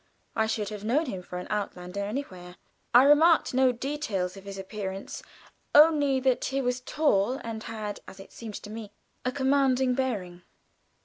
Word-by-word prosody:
I 220 -1 +2
should 215 -2 -2
have 210 -1 -7
known 265 +9 +1
him 190 -9 -5
for 180 0 -8
an 180 - -5
outlander 200 -2 -3
anywhere. 190 -6 -6 0.4
I 245 +2 +8
remarked 310 +3 +5
no 260 0 +4
details 235 -8 -3
of 195 0 -12
his 200 -1 -7
appearance; 195 0 -6 0.5
only 295 -3 +6
that 255 -1 +1
he 270 +1 -1
was 250 -1 -1
tall 250 -6 +1
and 225 -1 -5
had, 215 -2 -5
as 195 - -11
it 195 - -12
seemed 220 -3 -8
to 210 - -9
me, 215 -2 -8 0.3
a 255 - 0
commanding 265 -1 +2
bearing. 205 -10 -3
225 Hz, 170 wpm, -27 LUFS, 200-265 Hz, 0.5 s, I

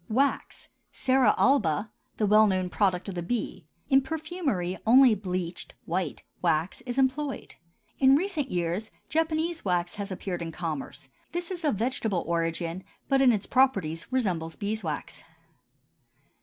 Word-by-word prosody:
WAX 270 +5 0 0.2
(Cera 260 -4 +3
alba), 210 - +2 0.3
the 215 - +2
well 215 +1 +6
known 185 -2 0
product 190 -3 +1
of 195 - -4
the 175 - -3
bee; 225 +7 -3 0.2
in 270 -1 +5
perfumery 300 - -2
only 250 +1 +7
bleached 185 -3 -4
(white) 175 -2 -2 0.2
wax 165 0 0
is 245 +1 -3
employed. 270 +2 0 0.5
In 270 0 +6
recent 315 -4 -1
years 175 +4 -2 0.2
Japanese 325 +2 0
wax 175 -2 0
has 200 -1 -4
appeared 185 -1 -4
in 165 -1 -4
commerce; 160 -6 -5 0.3
this 350 +1 -3
is 350 -2 -5
of 295 -7 +2
vegetable 220 -5 -1
origin, 165 +1 -2 0.3
but 270 0 +4
in 260 -2 +6
its 210 -3 -1
properties 195 -12 +1
resembles 180 -11 -1
beeswax. 200 -7 -4
210 Hz, 140 wpm, -27 LUFS, 175-270 Hz, 0.5 s, only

